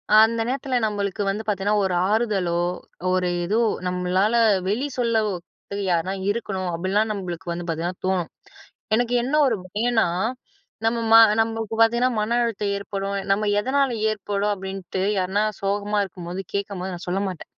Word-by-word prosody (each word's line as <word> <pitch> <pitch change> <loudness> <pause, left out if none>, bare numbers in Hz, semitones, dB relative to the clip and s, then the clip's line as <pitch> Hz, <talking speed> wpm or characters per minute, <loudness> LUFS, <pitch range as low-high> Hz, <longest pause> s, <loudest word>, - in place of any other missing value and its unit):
அந்த 225 +1 +5
நேரத்தில, 265 +1 -2
நம்மளுக்கு 205 -2 -2
வந்து 205 +3 -2
பார்த்திங்கனா 205 0 +1
ஒரு 190 - 0 0.2
ஆறுதலோ, 205 -6 +1 0.5
ஒரு 185 -1 +1 0.2
ஏதோ 205 +5 0 0.3
நம்மளால 180 +4 +1 0.3
வெளி 220 +8 0
சொல்லதுக்கு 210 -4 -2
யாருனா 175 +2 +1 0.2
இருக்கணும் 195 -4 -3
அப்படின்லாம் 195 +6 0
நம்மளுக்கு 180 -3 -5
வந்து 170 0 -4
பார்த்திங்கனா 170 +2 -2
தோணும். 185 -3 0 0.7
எனக்கு 240 +1 0
என்ன 265 +4 -3
ஒரு 230 -4 +1
பயம்ன்னா, 225 +2 +1 0.8
நம்ம 225 0 +5 0.2
நம்மளுக்கு 225 -1 -2
பார்த்திங்கன்னா, 235 +3 +4
மன 235 +3 +1
அழுத்தம் 210 -3 -1
ஏற்படும். 200 0 -3 0.2
நம்ம 210 +1 0
எதனால் 270 +2 +1 0.2
ஏற்படும் 205 0 -1
அப்படின்ட்டு, 190 -1 -5 0.2
யார்னா 190 +3 +1 0.2
சோகமா 205 +1 0
இருக்கும்போது, 180 0 -6
கேட்கும்போது 195 -2 -3
நான் 175 - -10
சொல்ல 190 +2 0
மாட்டேன் 180 -4 -8
200 Hz, 135 wpm, -23 LUFS, 185-225 Hz, 0.8 s, அந்த